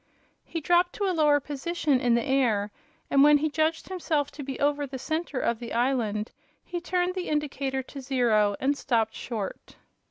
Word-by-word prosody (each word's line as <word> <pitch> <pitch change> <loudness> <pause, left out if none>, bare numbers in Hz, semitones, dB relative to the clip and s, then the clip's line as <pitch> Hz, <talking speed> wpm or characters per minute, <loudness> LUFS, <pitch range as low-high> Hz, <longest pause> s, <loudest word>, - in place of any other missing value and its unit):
He 330 - -5
dropped 350 +3 +3
to 415 - -4
a 375 - +1
lower 300 -3 +4
position 290 0 -1
in 240 -1 +3
the 235 - 0
air, 235 -7 +1 0.4
and 275 0 +6
when 295 0 +7
he 310 +2 0
judged 315 +1 0
himself 320 -6 -1
to 295 - -9
be 270 -1 -5
over 290 0 +1
the 265 0 -6
center 315 +1 -3
of 235 -2 0
the 235 - -6
island 230 -4 0 0.3
he 350 -1 -4
turned 360 0 0
the 365 -1 -4
indicator 275 -3 -1
to 275 +2 -9
zero 235 -6 +2
and 280 +2 +1
stopped 225 -5 0
short. 215 -5 -6
280 Hz, 185 wpm, -27 LUFS, 245-315 Hz, 0.4 s, when